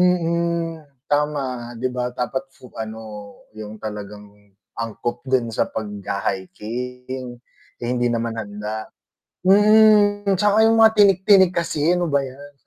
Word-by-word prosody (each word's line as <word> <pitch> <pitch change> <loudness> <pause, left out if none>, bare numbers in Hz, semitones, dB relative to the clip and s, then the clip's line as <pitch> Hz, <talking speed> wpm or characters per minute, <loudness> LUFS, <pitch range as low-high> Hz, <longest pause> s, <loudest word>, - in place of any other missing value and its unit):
Mm, 170 -2 +1 0.2
tama, 135 -5 -2
‘di 125 +2 -2
ba 125 -1 -2
dapat 130 +2 -3
su 130 -2 -17
ano 110 0 -6 0.5
yung 110 0 -9
talagang 105 -1 -7 0.5
angkop 115 +1 -4
din 125 -3 +1
sa - - 0
pagha-hiking. 110 +5 -5 0.4
Eh, - - -9
hindi 120 -1 +1
naman 115 -1 -1
handa. 105 +1 -6 0.6
Mm, 205 0 +5
tsaka 210 +3 +4
yung 225 0 +4
mga 220 0 +7
tinik-tinik 195 -2 +5
kasi 165 -1 +1
ano 175 -2 -1
ba 140 -1 +1
‘yan. 140 +2 -12
130 Hz, 125 wpm, -21 LUFS, 115-180 Hz, 0.6 s, mga